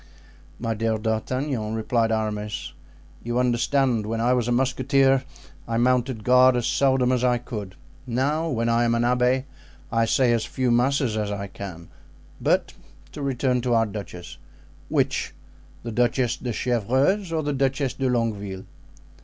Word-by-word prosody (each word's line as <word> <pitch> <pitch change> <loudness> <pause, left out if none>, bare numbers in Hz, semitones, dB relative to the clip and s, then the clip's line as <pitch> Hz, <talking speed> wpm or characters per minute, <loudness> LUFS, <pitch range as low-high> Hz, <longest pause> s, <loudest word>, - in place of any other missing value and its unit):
"My 115 -1 -2
dear 110 0 0
D'Artagnan," 110 +1 -2
replied 115 0 0
Aramis, 105 -1 -3 0.5
"you 120 +1 -2
understand, 125 -2 +1
when 115 +1 -2
I 120 +2 +3
was 120 -2 0
a - - 0
musketeer 135 +1 +2 0.4
I 115 0 -1
mounted 125 -1 +1
guard 125 +1 +6
as 120 - -1
seldom 130 -2 +2
as 125 -1 +1
I 125 -1 +3
could; 105 -6 -7 0.3
now 145 +7 0
when 115 -4 -1
I 115 +1 +3
am 115 0 +2
an 115 - +1
abbé 125 +1 +2 0.5
I 115 0 +2
say 125 +2 +3
as 115 -2 +1
few 130 -2 -1
masses 125 -1 +2
as 105 -1 -1
I 100 -1 -3
can. 95 -4 -9 0.5
But - - +1 0.4
to 150 - -8
return 130 -2 0
to 120 -1 +1
our 115 0 +3
duchess." 95 -5 -8 0.5
"Which—the 115 - -3
Duchess 120 +1 +1
de 125 - -4
Chevreuse 130 - +1
or 160 -1 -1
the 145 0 -1
Duchess 135 0 0
de 135 -1 -1
Longueville?" 105 -6 -2
120 Hz, 155 wpm, -24 LUFS, 110-130 Hz, 0.5 s, guard